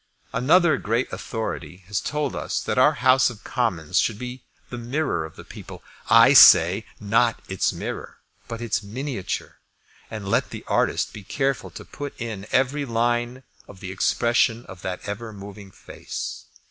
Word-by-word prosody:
Another 155 +6 +4
great 115 +4 -1
authority 110 -5 -5
has 100 0 -2
told 150 -3 -2
us - - -2
that - - -1
our - - +6
House 130 0 +4
of 110 -4 -11
Commons 80 -3 0
should 110 - 0
be 125 +2 -7 0.3
the 120 - -5
mirror 120 - -1
of 80 - -12
the - - -11
people. - - -11 0.3
I 115 +4 +7
say, 95 - +8
not 115 +3 +2
its 95 -1 0
mirror, - - -6 0.3
but 115 0 -6
its 115 -3 -1
miniature. 115 0 -5 0.5
And 110 -3 -6
let 100 - +1
the - - -8
artist - - 0
be 105 - -8
careful 135 +6 -1
to - - -11
put 145 -1 -8
in 110 -4 -5
every 135 +3 +1
line 120 +1 -1 0.2
of 95 - -13
the 95 -2 -6
expression 120 +4 +1
of 95 -3 -11
that 90 -1 -5
ever 110 +2 -5
moving 100 0 -10
face. - - -7
115 Hz, 160 wpm, -24 LUFS, 100-125 Hz, 0.5 s, say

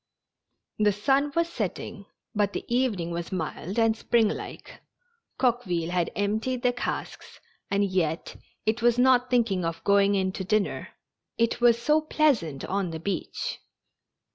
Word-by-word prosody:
The 210 -1 +4
sun 270 +8 +2
was 335 0 +2
setting, 340 - -5 0.3
but 205 -2 +1
the - - -4
evening 235 -9 0
was 170 0 -4
mild 185 +2 -4
and 225 -1 +3
springlike. 225 -1 -1 0.6
Coqueville 185 -10 0
had 180 -2 +1
emptied 220 +5 -1
the 250 -1 +3
casks, 245 - -5 0.3
and 200 0 +2
yet 180 -4 -1 0.3
it 220 +2 +1
was 240 0 +4
not 250 0 +4
thinking 225 -7 +2
of 165 0 -3
going 200 0 +4
in 190 -1 +1
to 190 - -5
dinner. 210 +1 0 0.5
It 230 +1 +1
was 235 -1 +5
so 300 +6 +3
pleasant 250 - +1
on 195 -1 -1
the 160 -1 -5
beach. 195 +5 -3
210 Hz, 140 wpm, -27 LUFS, 185-245 Hz, 0.6 s, was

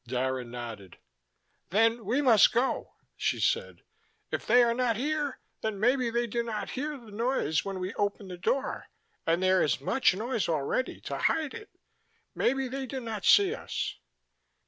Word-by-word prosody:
Dara 130 +1 -1
nodded. 115 -6 -8 0.7
"Then 225 +3 +2
we 255 +8 +1
must 230 -6 +6
go," 245 +3 -1 0.2
she - - -1
said. - - 0 0.5
"If - - -3
they 245 0 +6
are 235 -1 +3
not 240 -2 +1
here, 295 +1 -1 0.2
then 220 -3 -2
maybe 250 +2 +2
they 235 +1 0
do 235 +1 -1
not 230 -2 -4
hear 295 +3 -3
the 230 -5 -14
noise 210 - 0
when 195 -1 -4
we 185 +1 -4
open 205 -1 -2
the 180 -1 -7
door: 265 +9 -1 0.4
and 170 +3 +2
there 185 0 +4
is 145 -5 +1
much 180 - +2
noise 225 0 -1
already 160 - -1
to - - -5
hide 315 -4 +1
it. 435 -2 -9 0.6
Maybe 270 +1 +1
they 265 +1 -4
do 265 +2 -4
not 225 -4 -5
see 200 - +6
us." - - -4
225 Hz, 170 wpm, -29 LUFS, 185-255 Hz, 0.7 s, must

